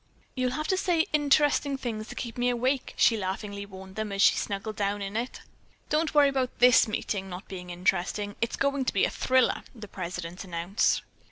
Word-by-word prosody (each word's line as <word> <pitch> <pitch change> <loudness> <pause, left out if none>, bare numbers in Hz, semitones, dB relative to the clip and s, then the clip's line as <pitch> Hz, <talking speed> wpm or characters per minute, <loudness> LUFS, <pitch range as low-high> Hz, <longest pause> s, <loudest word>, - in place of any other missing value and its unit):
"You'll 255 -1 -1
have 305 +3 -3
to 375 - +2
say 350 -3 +2
interesting 290 -1 +3
things 225 -4 -4
to - - -8
keep 235 -3 -5
me 245 0 +1
awake," 255 +2 -1
she 230 - +5
laughingly 200 0 -4
warned 190 -1 -11
them 215 -1 -2
as 195 0 +2
she - - +7
snuggled 205 +2 -3
down 200 0 -1
in 200 +1 -5
it. 240 +3 -3 0.5
"Don't 310 0 0
worry 290 -1 +7
about 265 -2 -2
this 250 -1 +6
meeting 200 -2 -3
not 180 +3 -8
being 180 -2 -8
interesting. 190 +3 -1
It's 230 - 0
going 280 -1 0
to - - 0
be 195 - +3
a - - -2
thriller," 260 -1 +2
the 220 -3 -9
president 175 -1 -6
announced. 175 +2 0
215 Hz, 195 wpm, -28 LUFS, 195-260 Hz, 0.5 s, she